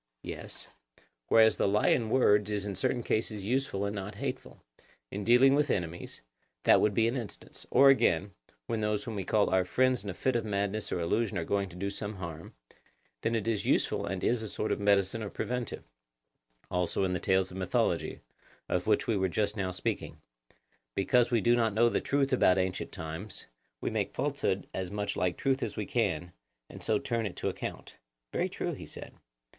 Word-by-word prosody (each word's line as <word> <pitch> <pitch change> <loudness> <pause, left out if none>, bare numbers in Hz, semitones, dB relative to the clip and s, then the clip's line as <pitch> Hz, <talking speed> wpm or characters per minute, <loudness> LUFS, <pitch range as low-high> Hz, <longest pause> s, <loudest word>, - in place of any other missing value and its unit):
Yes. - - -8 0.6
Whereas 110 -1 +5
the - - +2
lie 105 +2 +3
in 115 -3 +2
words 105 -5 +4
is 105 -1 -2
in 100 - -3
certain 120 +6 0
cases 110 -2 -1
useful 110 -3 0
and 100 +1 -3
not 100 +1 -5
hateful; - - -5 0.5
in 100 +1 -4
dealing 125 +5 +6
with 145 0 +2
enemies—that 80 - -1
would 105 -2 +2
be 115 0 +4
an 120 - -1
instance; 115 -6 -7
or 135 +2 +7
again, 100 -7 +2 0.3
when 115 -1 -2
those 105 -1 0
whom 115 - -5
we 100 -2 -3
call 105 +1 +2
our 95 0 +4
friends 130 +5 +2
in 100 - -5
a 90 - -4
fit 130 -2 0
of 120 - +1
madness 100 0 -2
or - - -1
illusion 105 +5 0
are 85 - -1
going 100 0 0
to 85 - -12
do 100 +2 -3
some 105 +1 -4
harm, 85 -4 -8 0.7
then 115 - 0
it 110 -1 -1
is 110 -3 0
useful - - +1
and 95 0 -3
is 120 -1 +2
a 110 - -5
sort 105 - -2
of - - 0
medicine 100 +1 +2
or 105 - -4
preventive; 125 +1 -4 0.9
also 90 +1 0
in 90 -1 +1
the 90 - -1
tales 95 +1 +1
of 90 - -8
mythology, 95 -1 0 0.5
of - - -1
which - - +3
we 115 - +1
were 95 -1 +1
just 105 +3 0
now 95 -3 -1
speaking—because - - -2
we 120 -3 +2
do 120 +4 +4
not 115 -3 +1
know 120 +2 +5
the - - 0
truth 140 -1 +1
about 95 -7 +4
ancient 95 -1 -1
times, 80 +6 -6 0.4
we - - -1
make - - -2
falsehood - - -1
as 95 -1 -3
much 105 0 -3
like 90 -1 0
truth 135 0 +1
as - - -3
we 105 - -2
can, 90 -8 -1 0.4
and - - -10
so - - +2
turn 115 -2 -1
it 95 - -8
to - - -1
account. - - -7 0.4
Very - - 0
true, - - -3
he - - -8
said. - - -10
105 Hz, 200 wpm, -30 LUFS, 95-115 Hz, 0.9 s, or